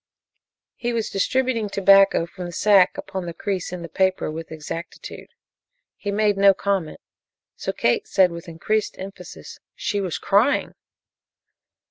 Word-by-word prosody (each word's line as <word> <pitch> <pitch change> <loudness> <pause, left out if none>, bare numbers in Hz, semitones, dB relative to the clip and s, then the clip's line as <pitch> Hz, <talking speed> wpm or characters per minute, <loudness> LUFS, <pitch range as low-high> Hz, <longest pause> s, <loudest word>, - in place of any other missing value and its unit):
He 240 -1 -2
was 225 -2 -2
distributing 235 +1 0
tobacco 195 -2 +5
from 180 +1 -8
the 175 - -6
sack 195 0 +4
upon 190 -2 -5
the 170 - -6
crease 190 -3 -3
in 180 -1 -6
the - - -6
paper 185 0 0
with 160 +1 -7
exactitude. 160 +2 -8 0.7
He 205 - -6
made 205 0 +1
no 195 0 +6
comment, 195 -6 -2 0.5
so - - -3
Kate 445 -2 0
said 190 - +3
with 170 0 -9
increased 210 +6 -2
emphasis: 190 -2 -10 0.2
"She 205 -2 -2
was 185 -4 -3
crying!" 220 +9 +2
195 Hz, 140 wpm, -23 LUFS, 175-205 Hz, 0.7 s, no